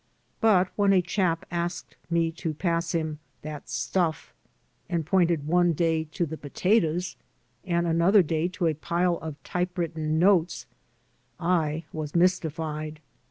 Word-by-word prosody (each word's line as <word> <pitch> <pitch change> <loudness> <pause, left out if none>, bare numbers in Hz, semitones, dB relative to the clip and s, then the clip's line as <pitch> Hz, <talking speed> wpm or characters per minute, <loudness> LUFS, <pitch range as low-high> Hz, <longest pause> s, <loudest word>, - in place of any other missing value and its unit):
But 190 -5 +4
when 200 -1 +4
a 185 - +5
chap 175 -2 0
asked 175 +1 -3
me 165 -1 +1
to 165 -1 -4
pass 170 0 -1
him 155 -2 -2 0.2
"that 150 -1 -7
stuflf," 155 +6 -1 0.6
and 170 -3 -1
pointed 170 -4 +2
one 175 +2 +3
day 160 0 +1
to 165 +3 -2
the 160 0 -6
potatoes 175 +3 0 0.5
and 170 -2 +1
another 170 +4 +4
day 160 +1 0
to 185 0 -3
a 160 - +3
pile 170 +3 0
of 160 -2 -6
typewritten 165 -3 -2
notes 180 -1 +3 0.7
X 165 -3 +1
was 155 -1 -5
mystified. 160 -3 0
170 Hz, 135 wpm, -26 LUFS, 155-180 Hz, 0.7 s, a